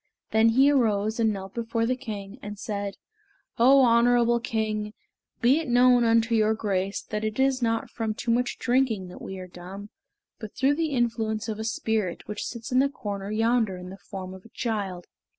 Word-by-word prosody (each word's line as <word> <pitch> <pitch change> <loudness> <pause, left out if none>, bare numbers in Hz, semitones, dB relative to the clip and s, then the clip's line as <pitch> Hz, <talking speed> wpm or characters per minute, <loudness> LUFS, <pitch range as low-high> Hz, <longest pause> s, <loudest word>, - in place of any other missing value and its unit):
Then 220 +1 +5
he 265 +5 +5
arose 220 -4 +1
and 220 -1 +3
knelt 195 -1 -6
before 230 -1 -1
the 255 +2 +1
king, 210 -2 -7
and 205 0 -7
said, 200 -1 -4 0.6
"Oh, 270 +4 +7
honorable 235 0 +4
king, 215 -2 -2 0.5
be 255 +5 +4
it 325 - -5
known 245 0 +5
unto 230 0 +3
your 220 -1 +3
grace 195 -2 -2
that 210 0 -4
it 215 +3 -3
is 265 -1 +2
not 225 -1 -1
from 220 -2 -3
too 235 - -2
much 245 +1 0
drinking 240 -7 +1
that - - -11
we 190 - -6
are 185 - -7
dumb, 185 +3 -10 0.5
but 215 -3 -8
through 270 +2 +3
the 320 +1 -1
influence 225 -3 -1
of 220 -1 -4
a - - -3
spirit 220 -4 -2
which 210 -1 -4
sits 235 0 -7
in 255 - +4
the 275 +1 +3
corner 200 -6 -5
yonder 225 -2 +1
in 180 0 -9
the 195 - -9
form 185 -1 -8
of 190 0 -12
a 230 - -16
child." 200 -7 -3
225 Hz, 195 wpm, -26 LUFS, 205-240 Hz, 0.6 s, Oh